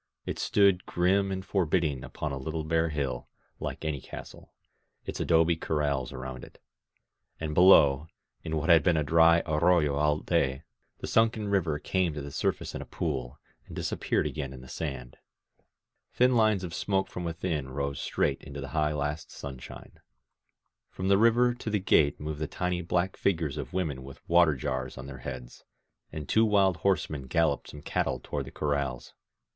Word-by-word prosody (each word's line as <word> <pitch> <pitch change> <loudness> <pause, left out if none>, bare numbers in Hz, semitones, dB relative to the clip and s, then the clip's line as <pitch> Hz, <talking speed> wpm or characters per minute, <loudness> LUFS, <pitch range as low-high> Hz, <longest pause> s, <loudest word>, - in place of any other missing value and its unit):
It - - -4
stood 100 -3 +3
grim 95 +3 +2
and 95 0 -4
forbidding 80 -7 0
upon 75 - -5
a 70 - -3
little 80 +4 -3
bare 80 +1 +1
hill, 70 -5 -3 0.3
like - - -5
any 75 -4 -2
castle, - - -10 0.5
its - - -5
adobe 80 +1 +3
corrals 75 -5 -1
around 65 -1 -7
it; - - -14 0.8
and 80 -1 -3
below, 75 -5 +6 0.4
in 80 0 -2
what 80 +4 -2
had 80 -2 +7
been 80 +2 +2
a 75 - +2
dry 85 +3 +5
arroyo 80 -1 +3
all 75 0 +2
day, 70 -5 0 0.4
th^ - - -2
sunken 110 -2 +2
river 85 -7 +1
came 90 0 -1
to 75 - -4
the 70 - -7
sur - - +1
face - - -9
in - - -5
a - - -7
pool, 70 -5 -3 0.3
and - - -10
disappeared - - -1
again 70 -4 -4
in 65 - -10
the 65 - -12
sand. 65 -5 -6 1.0
Thin 125 0 +4
lines 110 -4 +3
of 85 -3 -5
smoke 95 +2 0
from 90 - -6
within 80 -4 -3
rose 70 +1 -3
straight - - 0
into 70 +1 -8
the 70 -1 -6
high 75 +2 0
last 75 +1 -3
sunshine. 65 -3 -9 0.9
From 95 +1 -3
the 100 - +6
river 120 +2 +4
to 120 -2 -6
the 105 - +1
gate 80 -7 +3
moved 75 0 -5
the 80 - -2
tiny 90 +2 -2
black 90 +2 0
figures 80 -7 0
of - - -5
women 80 -8 -2
with 70 0 -13
water 85 -3 +5
jars 65 0 -3
on 65 - -7
their 70 -1 -8
heads: - - -8 0.5
and 75 -3 -6
two 110 - +4
wild 100 -5 +3
horsemen 80 -6 -1
galloped 80 0 +1
some 75 -1 -10
cattle - - -1
toward - - -4
the - - -10
corrals. 70 -4 -2
80 Hz, 180 wpm, -28 LUFS, 70-90 Hz, 1.0 s, had